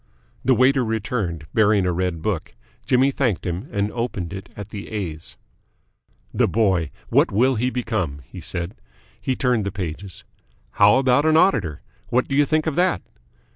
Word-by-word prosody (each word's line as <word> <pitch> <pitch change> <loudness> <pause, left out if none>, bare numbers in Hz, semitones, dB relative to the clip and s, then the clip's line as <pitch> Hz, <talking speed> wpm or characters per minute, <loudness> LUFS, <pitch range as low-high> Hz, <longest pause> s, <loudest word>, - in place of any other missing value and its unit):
The 130 0 +4
waiter 130 +1 +4
returned, 110 -8 -2
bearing 105 -3 +4
a 90 - +2
red 90 -2 -2
book. 95 -11 -2 0.3
Jimmy 130 +2 +4
thanked 125 -9 -1
him 90 - -4
and 100 0 -1
opened 110 -7 -3
it 95 0 -8
at 100 0 -7
the 105 -1 -7
A's. 85 -7 -5 1.0
"The - - +3
boy, 95 -8 +1 0.2
what - - +3
will 125 +6 +3
he 125 +2 0
become?" 110 - -2
he - - -10
said. 85 +3 -3 0.5
He 130 - -1
turned 125 -4 +1
the 100 - -2
pages. 90 0 -6 0.5
"How 105 - +5
about 130 +2 +3
an 160 0 +5
Auditor? 105 - +2 0.3
What 125 +1 +1
do 135 - -2
you 145 0 +4
think 155 -1 +1
of 160 - 0
that?" 180 0 +2
105 Hz, 170 wpm, -22 LUFS, 90-125 Hz, 1.0 s, How